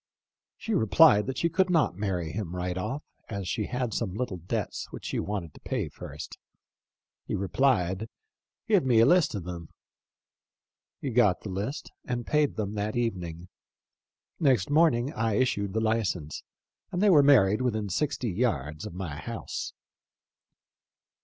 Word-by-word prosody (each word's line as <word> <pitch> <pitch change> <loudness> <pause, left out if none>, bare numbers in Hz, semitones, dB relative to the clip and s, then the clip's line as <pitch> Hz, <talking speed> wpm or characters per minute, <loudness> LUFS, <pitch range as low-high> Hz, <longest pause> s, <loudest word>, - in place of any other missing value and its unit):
She 225 - -3
replied 110 - +5
that 135 -1 -3
she 170 - +2
could 185 +3 +1
not 165 -5 +3
marry 90 -5 -2
him 90 -3 -4
right 90 0 -2
off, 135 +10 -3 0.3
as 100 -3 -4
she 105 +3 -1
had 125 -3 -2
some 100 -5 -2
little 110 -5 -3
debts 85 +1 -4
which - - -9
she - - -2
wanted 95 -7 -4
to - - -15
pay - - -3
first. - - -9 0.9
He - - -1
replied, 95 0 +1 0.6
'Give 205 -6 +4
me 125 -4 +4
a 115 - +7
list 175 -3 +4
of 100 - -4
them.' 85 -2 -7 1.3
He 135 - -3
got 110 -6 +3
the 105 - -7
list 105 +11 -4
and 120 -2 -3
paid 150 -1 +2
them 105 -2 -3
that 105 0 -2
even 115 -7 -1
ing. 85 +1 -8 0.9
Next 130 - +2
morning 145 -4 +3
I 115 -5 0
issued 100 -5 0
the 110 - 0
license, 105 -9 -1 0.5
and 175 - -2
they 205 0 +5
were 150 -5 +7
married 115 -7 +5
within 110 -5 0
sixty 125 +3 -1
yards 90 -6 -1
of 90 - -10
my 90 -6 -5
house." 70 - -5
110 Hz, 160 wpm, -28 LUFS, 95-130 Hz, 1.3 s, a